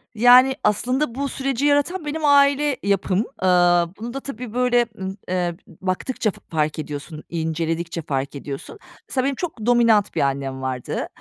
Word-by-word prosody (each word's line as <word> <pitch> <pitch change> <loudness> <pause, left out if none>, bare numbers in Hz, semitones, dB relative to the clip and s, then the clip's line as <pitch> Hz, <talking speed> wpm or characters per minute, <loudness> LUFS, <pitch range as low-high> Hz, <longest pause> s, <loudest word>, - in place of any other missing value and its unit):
Yani, 250 +3 +7
aslında 245 +5 0
bu 280 0 -2
süreci 270 0 -2
yaratan 295 +4 +1
benim 305 +1 -2
aile 285 -1 +4
yapım. 195 -1 +1 0.2
Iıı, 175 -2 +4
bunu 235 +2 -6
da 275 - -3
tabii, 250 -4 -7
böyle, 245 -1 +3
ımm, 190 +1 -5
eee, 180 -2 -1
b 180 +3 -12
baktıkça 215 +3 -1
f - - -17
fark 155 -1 -1
ediyorsun, 150 +1 -6
inceledikçe 165 +1 -2
fark 140 -2 -3
ediyorsun. 140 - -7 0.3
Mesela 260 -1 0
benim 275 -1 0
çok 280 -11 -5
dominant 230 -4 +3
bir - - +1
annem 135 -1 -1
vardı. 130 -2 -3
210 Hz, 160 wpm, -22 LUFS, 165-265 Hz, 0.3 s, Yani